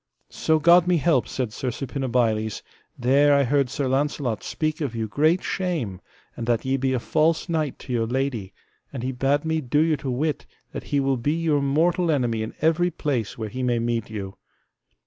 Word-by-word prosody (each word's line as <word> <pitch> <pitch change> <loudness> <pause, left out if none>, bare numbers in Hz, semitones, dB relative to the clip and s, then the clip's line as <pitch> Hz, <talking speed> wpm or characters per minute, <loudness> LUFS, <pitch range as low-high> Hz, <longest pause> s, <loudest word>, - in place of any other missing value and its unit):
So 160 - +1
God 170 +3 +5
me 180 -1 +3
help, 155 -5 +2
said 125 -5 -3
Sir 125 - -3
Suppinabiles, 120 -5 -1 0.3
there 140 +3 +4
I 140 - +4
heard 140 0 +1
Sir 135 +1 -2
Launcelot 135 -3 -1
speak 155 0 -2
of 135 -6 -2
you 110 -1 -2
great 155 - +2
shame, 155 - -2 0.3
and 115 - -5
that 120 -1 +1
ye 130 +1 +1
be 135 0 0
a 130 - +1
false 160 +7 +1
knight 155 -5 -1
to 125 - -7
your 115 -2 0
lady 125 -6 -2 0.4
and 130 -4 -6
he 130 - -1
bade 135 +4 0
me 160 0 0
do 130 +1 -1
you 160 -1 +3
to 135 0 -5
wit 145 +5 -2 0.2
that - - -6
he 145 - 0
will 135 -1 +1
be 145 +6 0
your 160 -3 +1
mortal 165 +5 +2
enemy 120 -7 +1
in 110 - -5
every 165 +3 +3
place 135 - -2
where 110 -2 -4
he 130 +4 -5
may 125 -1 +1
meet 115 -1 -1
you. 100 -3 -6
135 Hz, 200 wpm, -24 LUFS, 120-155 Hz, 0.4 s, God